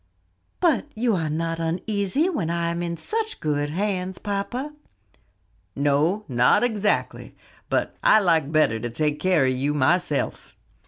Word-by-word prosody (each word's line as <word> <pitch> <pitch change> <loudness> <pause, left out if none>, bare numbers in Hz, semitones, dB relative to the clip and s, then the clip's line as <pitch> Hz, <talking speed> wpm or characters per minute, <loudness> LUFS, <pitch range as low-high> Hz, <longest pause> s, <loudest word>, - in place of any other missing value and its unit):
"But 320 -5 +2
you 230 -1 +1
are 160 -3 -1
not 165 +2 -2
uneasy 200 - 0
when 215 - -2
I 170 0 -1
am 170 0 -3
in 170 -1 -3
such 445 - -3
good 145 -1 -1
hands, 185 +1 -2
papa?" 230 +8 -4 1.0
"No, 150 +9 +1
not 125 - +3
exactly; 215 -4 -1 0.3
but - - -1
like 165 -8 +4
better 155 -8 +2
to 120 - -4
take 150 +5 -1
care 180 -7 +3
of 130 - +2
you 140 +3 -1
myself." 150 +2 0
170 Hz, 140 wpm, -24 LUFS, 150-205 Hz, 1.0 s, like